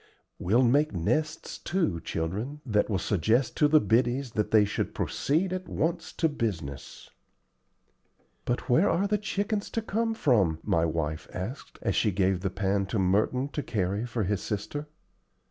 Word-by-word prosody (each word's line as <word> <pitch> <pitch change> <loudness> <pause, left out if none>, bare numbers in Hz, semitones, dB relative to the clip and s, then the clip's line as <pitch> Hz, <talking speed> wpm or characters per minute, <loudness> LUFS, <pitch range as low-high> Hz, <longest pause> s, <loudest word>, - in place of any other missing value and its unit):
We'll 110 +8 +3
make 145 +4 +3
nests, 155 - -1
too, 170 - 0
children, 105 - -3
that 105 -4 +1
will 100 - +1
suggest 110 - +1
to 150 - +5
the 155 +1 +6
biddies 120 +3 +1
that 105 -2 -1
they 110 -2 +5
should 100 - -3
proceed 175 +6 0
at 185 0 -5
once 165 +2 -1
to 165 - +2
business." 95 - -5 1.3
"But 120 - -2
where 160 +11 +4
are 185 +4 +2
the 210 +1 +1
chickens 205 0 -2
to 225 - -2
come 225 +1 -1
from?" 105 - +3
my 80 0 +2
wife 80 -1 -2
asked, 105 +10 -6
as - - 0
she 110 - +3
gave 95 -1 +1
the 95 +1 -1
pan 100 +1 0
to 110 - -2
Merton 105 +8 +1
to 150 - -3
carry 100 -1 -1
for 115 -2 -2
his 100 0 -1
sister. 145 +8 -4
115 Hz, 165 wpm, -28 LUFS, 95-150 Hz, 1.3 s, the